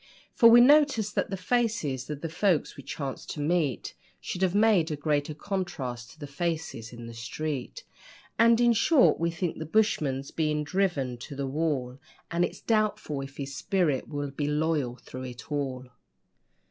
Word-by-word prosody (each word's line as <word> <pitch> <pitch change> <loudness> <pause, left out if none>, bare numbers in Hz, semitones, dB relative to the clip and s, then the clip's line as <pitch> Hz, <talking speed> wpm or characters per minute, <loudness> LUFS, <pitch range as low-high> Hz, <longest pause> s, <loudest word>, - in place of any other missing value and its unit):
For 230 - +7
we 240 +1 +9
noticed 275 -6 +4
that - - 0
the 195 - -3
faces 185 - -1
of 150 -1 -5
the 165 - -2
folks 175 -1 +1
we - - -9
chanced 140 0 -6
to - - -7
meet 150 - 0 0.3
Should 180 - -5
have 190 0 +2
made 205 -6 +4
a 155 - -2
greater 145 0 -1
contrast 145 - -4
to 155 - -17
the 145 - -6
faces 145 -6 -4
in 120 -1 -9
the 115 - -8
street; 145 - -5 0.6
And, 230 0 +6
in 240 -1 +5
short, 265 +4 +4
we 170 +1 +1
think 170 0 -3
the 160 - -4
bushman's 150 -9 +1
being 150 -2 0
driven 150 -8 -1
to 140 - -8
the 140 0 -3
wall, 135 -3 -2 0.3
And 170 +1 +1
it's - - -3
doubtful 215 -9 0
if 135 +1 -9
his 140 -1 -5
spirit 165 -6 0
will 145 -2 -4
be 145 +1 -2
'loyal 150 -4 0
thro' 130 +1 -10
it 125 +4 -9
all'. 135 -3 -2
155 Hz, 175 wpm, -28 LUFS, 135-190 Hz, 0.6 s, we